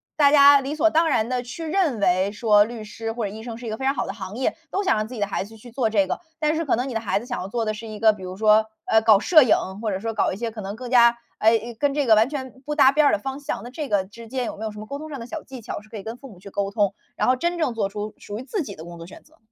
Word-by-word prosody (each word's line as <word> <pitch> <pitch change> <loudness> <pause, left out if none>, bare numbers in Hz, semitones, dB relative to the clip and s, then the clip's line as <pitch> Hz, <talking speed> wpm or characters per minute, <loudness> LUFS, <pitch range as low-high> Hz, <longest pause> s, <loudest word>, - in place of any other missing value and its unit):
大 285 -2 +5
家 285 -1 +8
理 275 +3 -4
所 325 +1 +4
当 320 +1 +3
然 225 -5 +1
地 250 -1 -1
去 270 +7 -7
认 315 - +1
为 190 +1 +2
说， 210 -1 +4
律 225 0 -7
师 225 +1 -5
或 230 -1 -3
者 200 - -3
医 220 +1 -9
生 230 -2 -6
是 240 - -10
一 - - -3
个 215 - -3
非 265 - -8
常 270 - +3
好 - - -2
的 - - -4
行 195 +2 -7
业， 260 - 0
都 395 - -1
想 380 - +3
让 215 0 -1
自 250 - -10
己 240 - -6
的 205 - 0
孩 195 - -2
子 225 +2 -13
去 240 +2 -13
做 235 -2 0
这 200 -3 +2
个。 - - -3 0.2
但 305 0 +1
是 330 - -1
可 290 - +1
能 250 +3 -2
你 255 - -5
的 225 - -1
孩 205 -2 0
子 230 - -10
想 245 -5 -4
要 190 - -6
做 230 +1 -1
的 215 - -1
是 225 +2 -8
一 215 -1 -8
个， 220 -1 +5
比 195 -3 -11
如 185 +1 -7
说， 215 0 +4 0.2
呃， 220 - +4
搞 220 -2 +6
摄 310 - +6
影， 230 - +4 0.3
或 215 -2 -1
者 190 - -2
说 225 +1 -3
搞 215 - +1
一 190 - -5
些 230 0 -3
可 215 -1 -7
能 195 +1 -5
更 250 0 -7
加， 235 -1 +5 0.2
哎， 225 +1 +5
诶， 235 +2 -7
跟 280 +5 0
这 290 -2 0
个 220 - +6
完 220 +5 +4
全 260 -2 -7
不 300 - -3
搭 275 -2 +6
边 300 0 +4
儿 - - +4
的 205 - +1
方 270 +5 -5
向。 285 - -4
那 240 - -8
这 285 +2 -5
个 200 -2 +1
之 225 +3 -13
间 255 -1 -2
有 - - -5
没 215 - -8
有 220 - -3
什 210 - -10
么 215 - -7
沟 280 +5 -6
通 310 0 -8
上 280 - -6
的 230 - -7
小 315 +5 -7
技 260 -2 -10
巧， 210 - -6
是 215 - -20
可 220 - -8
以 195 - -8
跟 225 +1 -6
父 270 +1 -12
母 185 - -15
去 200 +2 -11
沟 200 0 -2
通， 200 -2 +1 0.2
然 - - +1
后 255 - +4
真 345 +6 -1
正 310 -8 0
做 205 -3 -1
出 210 +1 -5
属 205 +1 -7
于 255 - -7
自 370 +7 -3
己 200 -8 -8
的 160 - -10
工 175 0 -10
作 165 - -9
选 185 - -13
择？ 315 +1 -25
230 Hz, 385 characters per minute, -23 LUFS, 210-270 Hz, 0.3 s, 家